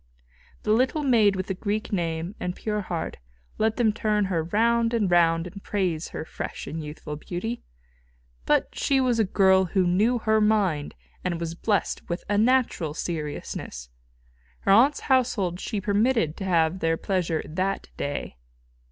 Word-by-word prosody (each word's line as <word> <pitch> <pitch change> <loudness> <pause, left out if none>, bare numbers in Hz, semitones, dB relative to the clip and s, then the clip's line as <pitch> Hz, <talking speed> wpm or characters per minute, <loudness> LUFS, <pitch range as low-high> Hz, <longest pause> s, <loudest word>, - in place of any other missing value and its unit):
The 215 - 0
little 260 +6 +2
maid 220 -7 +4
with 185 -1 -2
the 195 - -2
Greek 210 +3 -3
name 170 0 -2
and 180 0 -3
pure 210 -1 -2
heart, 170 -4 -4 0.4
let 220 0 +2
them 225 -4 +3
turn 210 -2 +1
her 165 -2 0
round 230 +5 +2
and 205 -5 +1
round 165 -1 +4
and 195 +3 -9
praise 180 -7 -1
her - - -6
fresh - - -6
and 160 0 -5
youthful 150 0 -7
beauty. 190 +9 -4 0.9
But - - +2
she 275 -1 +1
was 250 -3 +2
a - - +5
girl 190 -1 +4
who 185 +1 +1
knew 210 +8 +3
her 220 -1 +2
mind, 195 -9 +1 0.3
and 175 -2 -2
was 165 -1 -3
blessed 205 +4 -1
with 170 +1 -3
a 205 0 +1
natural 225 - +2
seriousness. 150 - -5 0.7
Her - - +2
aunt's 255 +9 +5
household 230 -9 +1
she 210 0 -3
permitted 205 - +1
to 195 - -5
have 170 -1 +2
their 165 -1 +1
pleasure 175 -5 -1
that 190 +5 -2
day. 140 - -4
195 Hz, 160 wpm, -25 LUFS, 170-220 Hz, 0.9 s, a